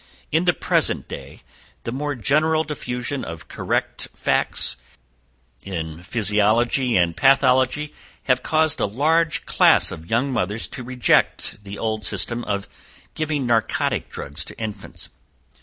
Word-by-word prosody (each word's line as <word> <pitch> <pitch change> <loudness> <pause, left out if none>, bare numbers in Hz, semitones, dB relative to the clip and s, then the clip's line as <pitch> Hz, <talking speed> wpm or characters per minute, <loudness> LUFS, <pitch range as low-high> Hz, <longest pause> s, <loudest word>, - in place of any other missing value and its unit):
"In 160 +4 +2
the 175 - +4
present - - +1
day, - - -9 0.4
the 115 - -4
more 145 +3 -2
general 155 +6 +2
diffusion 130 -3 -4
of 80 0 -8
correct - - -2
facts - - +1 0.9
in 80 -4 -5
physiology 110 +4 +2
and 85 -2 +2
pathology 135 +2 +3 0.3
has 125 -2 +2
caused 155 +3 +1
a - - +1
large 155 +9 +1
class - - +4
of 80 +1 -9
young 130 +4 +1
mothers 105 0 -1
to 140 - -7
reject 125 -4 +1
the 100 0 -8
old 110 -1 -2
system 120 +2 +1
of 100 -1 -2 0.5
giving 150 -3 -1
narcotic 115 -2 0
drugs 70 0 -4
to - - -11
infants. 105 -3 -6
120 Hz, 130 wpm, -22 LUFS, 105-145 Hz, 0.9 s, the